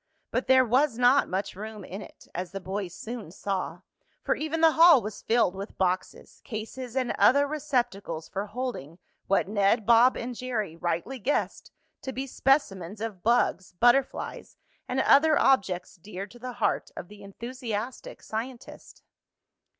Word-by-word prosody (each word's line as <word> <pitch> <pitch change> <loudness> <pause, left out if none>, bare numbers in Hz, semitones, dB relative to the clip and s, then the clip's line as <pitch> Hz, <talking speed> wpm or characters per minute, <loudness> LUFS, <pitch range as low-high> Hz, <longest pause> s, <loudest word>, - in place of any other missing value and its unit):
But - - -1
there 260 0 +6
was 255 +1 +2
not 250 +3 +4
much 190 +1 -3
room 215 +1 -8
in 195 +3 -7
it, - - -14
as 180 +1 -5
the 195 - -4
boys 190 -1 -4
soon 230 -6 -7
saw, 185 -1 -4 0.4
for - - +2
even 315 +1 -3
the 325 -1 +7
hall 330 -2 +7
was 210 -2 -7
filled 225 -5 +2
with 195 +2 -8
boxes, 185 -1 -2
cases 235 +1 -6
and 255 -2 0
other 285 +2 +5
receptacles 245 - -2
for 200 +2 -4
holding 215 - -5 0.3
what 195 -1 +2
Ned, 205 +1 +2
Bob 235 +2 +5
and 245 +1 -4
Jerry 220 -9 -3
rightly 175 +10 -3
guessed 265 +7 -2 0.3
to 265 - -5
be 265 +1 -4
specimens 215 - 0
of 215 -4 -5
bugs, 230 -5 +1
butterflies 245 +7 +1 0.3
and 255 - -1
other 305 +3 +5
objects 190 -8 +1
dear 195 +1 -7
to 240 +4 -16
the 250 +1 -6
heart 235 -3 -1
of 175 - -7
the 210 +1 -14
enthusiastic 235 +3 -6
scientist. 235 +3 -7
225 Hz, 155 wpm, -27 LUFS, 195-255 Hz, 0.4 s, the